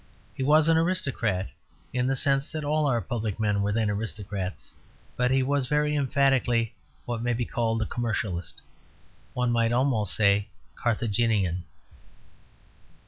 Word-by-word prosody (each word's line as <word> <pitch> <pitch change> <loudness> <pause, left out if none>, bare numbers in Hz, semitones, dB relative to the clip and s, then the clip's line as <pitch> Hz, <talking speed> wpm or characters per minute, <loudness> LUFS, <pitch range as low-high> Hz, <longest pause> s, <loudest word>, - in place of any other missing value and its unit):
He - - -7
was 150 +3 +4
an 165 0 +5
aristocrat, 130 - 0 0.4
in 125 0 +1
the 135 - +1
sense 135 +1 +1
that 155 -2 -4
all 150 0 +1
our 120 -4 +1
public 110 +1 -3
men 105 -2 +1
were 100 +1 0
then 110 0 +1
aristocrats; 105 -2 -4 0.4
but 125 0 +1
he 130 0 +3
was 140 -1 0
very 150 +1 +1
emphatically 130 -4 +2 0.3
what 120 -2 -3
may 120 0 0
be 120 +1 -1
called 115 -1 0
a - - -4
commercialist 105 -7 -3 0.8
one 125 -1 +1
might 115 -1 +2
almost 120 -5 +1
say 100 0 +3 0.3
Carthaginian. 105 -6 0
120 Hz, 140 wpm, -27 LUFS, 105-135 Hz, 0.8 s, an